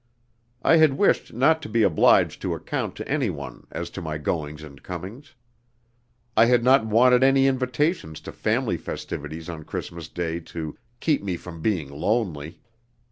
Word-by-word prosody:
I 165 - +6
had 155 -4 +4
wished 205 - +2
not 145 +7 +3
to 145 - -7
be 115 +1 +2
obliged 90 -6 +4
to - - -1
account - - -4
to - - -7
anyone - - -3
as 85 +1 -5
to 95 - -6
my 80 -2 -4
goings 75 0 -3
and 70 -2 -12
comings. 95 - -8 1.0
I 110 - +7
had 120 0 +3
not 125 -3 +5
wanted 125 +3 +5
any 135 0 +5
invitations 130 - 0
to - - -8
family - - 0
festivities 80 +1 -6
on 80 -3 -6
Christmas 85 +1 -6
Day 85 -1 -3
to 80 -2 -7 0.3
"keep 155 -3 +2
me 95 -3 -3
from 85 -2 -10
being 85 -8 -1
lonely." 80 -2 -2
95 Hz, 160 wpm, -24 LUFS, 80-125 Hz, 1.0 s, I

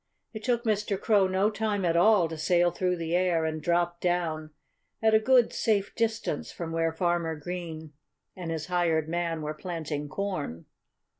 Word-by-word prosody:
It 220 -1 -7
took 240 -2 +1
Mr. 210 -3 0
Crow 205 -3 +3
no 190 +3 +1
time 210 -3 -1
at 170 -1 +2
all 185 0 +5
to 160 - -6
sail 175 +2 +2
through 180 0 0
the 165 0 -2
air 175 -3 +2
and 155 0 -2
drop 175 0 +1
down 165 -3 -1 0.5
at 220 0 +3
a 220 - +7
good, 245 +1 +4
safe 205 -3 0
distance 225 -9 -2
from 165 -2 -6
where 165 0 +1
Farmer 170 -1 0
Green 160 -1 -6 0.4
and 180 -3 -6
his 160 -1 -3
hired 170 -3 +1
man 165 -1 -2
were 150 0 -3
planting 155 -3 -5
corn. 150 - -4
175 Hz, 170 wpm, -28 LUFS, 160-200 Hz, 0.5 s, a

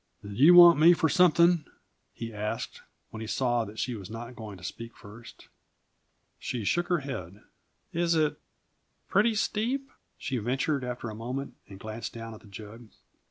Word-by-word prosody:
"Did 100 +2 -8
you 165 +6 +8
want 175 -3 +9
me 165 +3 +8
for 165 -1 +1
something?" 175 -2 +4 0.5
he 115 -1 -7
asked, 105 0 -4 0.3
when 110 - -8
he 110 - -5
saw 120 -1 0
that 105 +1 -11
she 125 - -2
was 100 -4 -8
not 120 +2 -8
going 105 -4 -8
to 90 - -16
speak 115 +6 -8
first. 115 +3 -13 0.9
She 120 -3 -4
shook 175 - 0
her 175 -4 +1
head. 105 -8 -7 0.5
"Is 170 0 +1
it 155 -2 +1 0.7
pretty 215 +3 +3
steep?" 245 +6 -1 0.3
she 130 -3 -3
ventured 130 +5 -1
after 120 -2 -5
a - - -8
moment, 125 +5 -5
and 95 -1 -12
glanced 110 +4 -6
down 115 -1 -8
at 110 - -11
the - - -17
jug. 110 +3 -11
120 Hz, 170 wpm, -28 LUFS, 110-165 Hz, 0.9 s, want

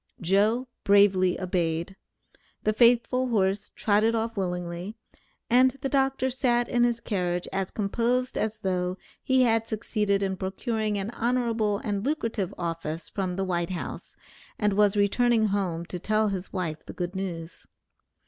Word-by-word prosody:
Joe 210 +8 +2 0.2
bravely 195 -2 +4
obeyed. 175 0 -1 0.7
The 215 - +2
faithful 245 +2 +4
horse 195 -4 0
trotted 215 +2 +2
off 225 0 -2
willingly, 180 +1 -3 0.5
and 255 +2 +4
the 270 - -1
doctor 270 -1 +1
sat 245 -2 +1
in 240 -1 +2
his 240 -1 +2
carriage 180 -5 -2
as 190 -1 -1
composed 240 +5 0
as 220 0 -2
though 185 -2 -1 0.2
he 260 -1 +3
had 225 -2 +2
succeeded 210 -3 0
in 190 -1 -1
procuring 210 +3 -2
an 200 +3 -3
honorable 230 -4 0
and 205 -2 -2
lucrative 230 - -1
office 165 -1 -4
from 185 -3 -2
the 195 +1 -1
White 175 -2 -1
House, 180 -2 -6 0.4
and 210 -2 +1
was 205 0 +3
returning 225 +3 +3
home 180 -4 -1
to 180 +1 -6
tell 215 +3 +1
his 190 -1 -4
wife 170 -5 -3
the - - -7
good 180 +1 -4
news. 170 -3 -6
205 Hz, 150 wpm, -27 LUFS, 185-230 Hz, 0.7 s, bravely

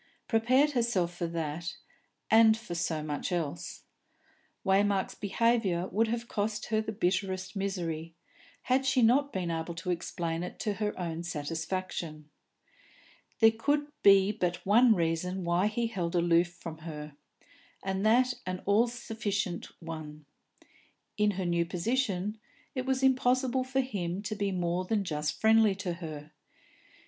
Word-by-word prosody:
Prepared 255 +6 +3
herself, 230 -9 0
for 175 -1 -3
that, 165 +1 -4 0.6
and 220 0 +7
for 225 -6 -7
so 165 -2 -1
much 150 +4 -3
else. 165 -5 -3 0.8
Waymark's 195 0 +2
behaviour 200 -4 +1
would 225 +4 +2
have 235 +1 -3
cost 210 0 -2
her 215 0 +2
the 220 - -4
bitterest 190 -1 -1
misery, 165 -5 -3 0.5
had 260 +1 +2
she 260 -2 +3
not 280 +5 +4
been 180 -3 -2
able 165 +1 -3
to 170 +2 -3
explain 170 -1 -3
it 180 - -6
to 210 -2 0
her 210 -2 -1
own 170 -2 -3
satisfaction. 160 -1 -4 1.1
There 225 0 +8
could 290 +6 0
be 195 0 +6
but 180 -4 -2
one 225 +3 +6
reason 175 +2 -1
why 175 +3 +2
he 230 +2 -1
held 180 -6 -2
aloof 170 0 +4
from 165 -2 -9
her, 150 -2 -8 0.7
and 195 0 -2
that 250 +4 +4
an 185 0 -3
all 210 +4 +4
sufficient 220 -6 -3 0.2
one. 155 -2 -7 0.9
In 210 0 +3
her 190 - -1
new 170 -1 +2
position, 210 +2 -1 0.3
it 255 -1 -3
was 265 0 0
impossible 260 0 +3
for 265 +1 0
him 195 -7 -3
to 215 +1 -3
be 200 -1 -1
more 175 0 -1
than 205 +2 0
just 150 -4 -2
friendly 220 -2 +5
to 190 -3 -3
her. 155 -3 -8
190 Hz, 145 wpm, -30 LUFS, 170-225 Hz, 1.1 s, There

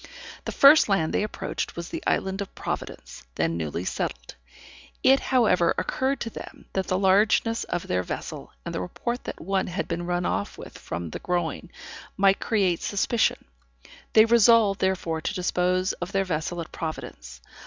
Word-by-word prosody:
The - - -3
first 280 -3 +7
land 165 -6 +1
they - - +2
approached 210 - -4
was 170 0 -6
the - - -5
Island 190 +1 0
of 195 - -7
Providence, - - -6
then 85 - 0
newly 85 +2 -3
settled. - - -4 0.7
It 270 +1 +6
however 210 -10 +3
occurred 265 0 -1
to 230 - -3
them, - - -10
that 190 -1 -1
the 185 - +1
largeness 210 +4 +3
of 175 - -3
their 90 - 0
vessel, 90 - -6
and - - -4
the - - -2
report 240 - -4
that - - -6
one 190 +2 -1
had 180 +2 -3
been 175 +1 -3
run 175 0 -1
off 100 - -2
with - - -10
from 85 -1 -5
the - - -5
Groine, 175 -1 -2 0.5
might 195 0 +4
create 195 -7 +1
suspicion; 220 +3 0 0.7
they 220 0 +8
resolved 230 -3 +5
therefore 170 -4 0
to 205 - -3
dispose 180 0 +1
of 175 +2 -6
their 195 0 +1
vessel 170 0 -2
at 165 - -9
Providence. 155 - -7
185 Hz, 170 wpm, -25 LUFS, 170-210 Hz, 0.7 s, they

